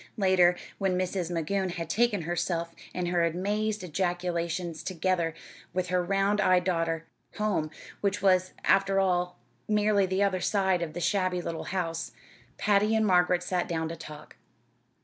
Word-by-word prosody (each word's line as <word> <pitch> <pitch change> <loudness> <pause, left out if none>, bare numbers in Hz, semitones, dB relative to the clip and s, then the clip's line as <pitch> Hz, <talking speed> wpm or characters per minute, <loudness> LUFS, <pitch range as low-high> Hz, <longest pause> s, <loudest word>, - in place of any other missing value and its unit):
Later, 185 -3 +4 0.2
when 190 -2 +1
Mrs. 185 -1 -1
Magoon 185 +3 -1
had 165 -2 -4
taken 210 0 +1
herself 170 0 -2 0.2
and 180 -1 -2
her 175 -1 +2
amazed 205 +5 -1
ejaculations, 175 -1 -2
together 170 -2 -1 0.4
with 180 -1 -1
her 180 -1 +1
round 195 +3 +1
eyed 185 -2 +4
daughter, 165 -3 -1 0.3
home 205 -7 0 0.3
which 200 0 0
was, 185 -2 +3
after 195 0 +3
all, 180 -2 +1 0.3
merely 210 -2 +3
the 190 +2 +1
other 190 -2 +1
side 190 -3 +1
of 160 -2 -3
the 175 - -5
shabby 185 +1 +1
little 165 -2 -4
house 165 -7 -3 0.4
Patty 210 +1 +3
and 220 0 +3
Margaret 180 -2 +3
sat 180 -1 -1
down 160 -1 -2
to 165 - -5
talk. 150 -2 -11
180 Hz, 150 wpm, -28 LUFS, 170-195 Hz, 0.4 s, Later